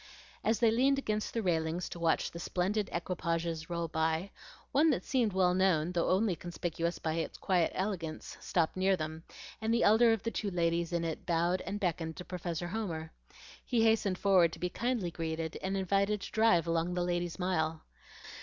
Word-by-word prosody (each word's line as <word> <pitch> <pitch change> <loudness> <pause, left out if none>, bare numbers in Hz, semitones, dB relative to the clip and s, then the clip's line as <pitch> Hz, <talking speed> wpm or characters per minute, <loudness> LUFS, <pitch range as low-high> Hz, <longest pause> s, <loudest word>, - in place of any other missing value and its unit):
As 220 0 +2
they 230 -2 +5
leaned 265 +4 +3
against 215 -6 -2
the 230 - -2
railing 165 -2 0
to 175 -1 -6
watch 165 -1 +1
the 170 - -7
splendid 195 +4 -1
equipages 170 -2 -2
roll 170 -1 -2
by, 160 +3 -1 0.4
one 310 +4 +4
that - - +1
seemed 245 -5 +1
well 185 -1 +3
known, 180 -3 +2
though 175 -2 0
only 190 0 +2
conspicuous 170 0 -3
by 160 - -2
its 165 0 -3
quiet 180 -3 +1
elegance, 185 -5 -3
stopped 165 -3 0
near 190 0 +2
them, 160 0 -5 0.4
and 220 +1 0
the 235 +1 +3
elder 225 +3 +6
of 225 -3 0
the 230 - -1
two 210 - -2
ladies 170 -1 0
in 170 -1 0
it 165 -2 -4
bowed 170 +2 +1
and 205 - -3
beckoned 165 -4 -2
to 180 - -7
Professor 175 -1 -4
Homer. 170 -7 -4 0.5
He 235 -3 +1
hastened 220 -4 +2
forward 185 -5 +4
to - - -8
be 180 +2 -1
kindly 230 -4 -1
greeted 160 -1 -4
and 190 +1 -1
invited 200 +2 +1
to - - -7
drive 220 -7 +4
along 165 +1 0
the 180 - 0
Ladies' 175 -1 -2
Mile. 160 -4 -1
180 Hz, 190 wpm, -32 LUFS, 165-200 Hz, 0.5 s, elder